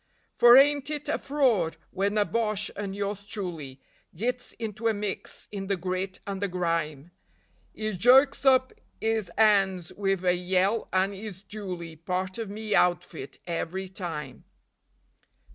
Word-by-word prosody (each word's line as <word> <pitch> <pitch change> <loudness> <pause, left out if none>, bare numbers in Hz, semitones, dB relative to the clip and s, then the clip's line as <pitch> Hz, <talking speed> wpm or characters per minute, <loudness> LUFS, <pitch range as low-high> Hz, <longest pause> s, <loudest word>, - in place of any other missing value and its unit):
For 240 +1 +8
ain't 285 +1 +5
it 300 -1 -3
a - - 0
fraud! 245 - +1
when 200 +2 0
a 205 - +4
Boche 215 -3 -1
and 200 -1 -4
yours 200 0 -3
truly 165 -10 -5 0.4
Gits 245 +7 -2
into 225 0 -4
a 225 - +2
mix 205 -1 -4
in 195 -2 -5
the 195 -1 0
grit 185 +1 -3
and 195 -1 -4
the 200 - +1
grime, 165 -4 -2 0.6
'E 215 0 -2
jerks 260 +10 +5
up 260 -1 +4 0.3
'is 220 -4 0
'ands 195 -5 +3
wiv 195 -2 -1
a 180 - +5
yell 185 +4 +1
and 190 +2 +2
'e's 200 -1 -8
duly 180 -6 -6
Part 185 +5 -3
of 225 -3 -4
me 215 +1 -4
outfit 175 -7 +1
every 180 +2 -3
time. 155 - -6
195 Hz, 145 wpm, -27 LUFS, 180-220 Hz, 0.6 s, For